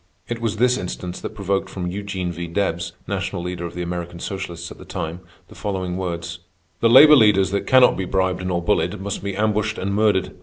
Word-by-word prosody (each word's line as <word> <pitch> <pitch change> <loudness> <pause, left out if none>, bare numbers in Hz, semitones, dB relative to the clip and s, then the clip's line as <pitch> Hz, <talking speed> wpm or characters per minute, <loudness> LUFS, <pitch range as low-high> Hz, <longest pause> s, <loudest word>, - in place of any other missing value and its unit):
It 120 -1 -4
was 110 -2 -1
this 125 +2 +3
instance 90 0 -5
that - - -6
provoked 100 -1 -1
from 90 -2 -5
Eugene 95 -2 -3
V. 85 0 -5
Debs, 85 -1 -2
national 85 - -3
leader 90 -1 -4
of 85 - -11
the 90 - -3
American 85 0 -5
socialists 95 -3 -5
at - - -11
the - - -10
time, 80 +2 -5 0.3
the - - -15
following 95 -4 -3
words: 85 -2 -4 0.4
"_The 115 - +4
labor 150 +4 +10
leaders 105 -6 +4
that 100 - -2
cannot 130 -1 +6
be 95 - -2
bribed 95 0 0
nor 90 -2 -1
bullied, - - 0
must 100 0 -4
be 100 -1 -3
ambushed 110 +1 0
and 100 +1 -2
murdered. 105 -3 +1
95 Hz, 205 wpm, -22 LUFS, 90-105 Hz, 0.4 s, labor